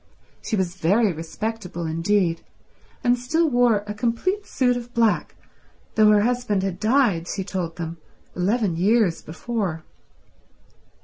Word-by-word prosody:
She 220 - -2
was 190 -2 -2
very 200 +4 +2
respectable 180 +2 -5
indeed, 165 +2 +1 0.6
and 245 0 +3
still 320 +7 +1
wore 245 -6 +3
a 210 - -4
complete 245 - -1
suit 250 -2 +1
of 245 0 -7
black 230 -2 +1 0.6
though 215 -1 +5
her 210 -1 +5
husband 240 -5 0
had 190 -2 -3
died, 215 -7 +2
she 195 - -3
told 180 -4 -4
them, 165 -1 -5 0.4
eleven 195 -1 0
years 200 -1 +2
before. 175 -1 -4
210 Hz, 130 wpm, -23 LUFS, 175-240 Hz, 0.6 s, though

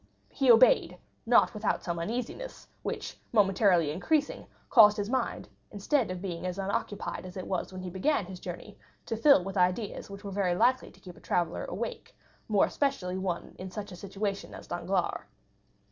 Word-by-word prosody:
He 270 -2 0
obeyed, 230 -6 +6 0.3
not 240 - +5
without 210 -1 -1
some 170 -1 -3
uneasiness, 245 - -5
which, - - -5
momentarily 195 -6 +3
increasing, 295 - -1 0.2
caused 210 -4 +7
his 205 +2 -2
mind, 260 -2 -1 0.2
instead 220 +4 0
of 185 0 -5
being 175 -3 -4
as 180 0 -3
unoccupied 200 +1 -3
as 185 +1 -9
it 185 - -5
was 185 -1 -3
when 185 0 -7
he 180 - -5
began 215 - +1
his 185 0 -9
journey, 180 +4 -8 0.3
to 225 - -2
fill 230 -3 +5
with 195 +1 -5
ideas 185 +5 0
which 200 +1 -9
were 200 - -6
very 190 -3 0
likely 255 +7 +2
to - - -20
keep 180 -3 -11
a - - -16
traveller 175 -2 -1
awake, 215 +6 -6 0.3
more 210 -3 +4
especially 190 -10 -1
one 180 -3 -3
in 185 +1 -6
such 205 +2 -7
a - - -8
situation 200 +2 -4
as - - -10
Danglars. - - -1
195 Hz, 175 wpm, -29 LUFS, 180-225 Hz, 0.3 s, caused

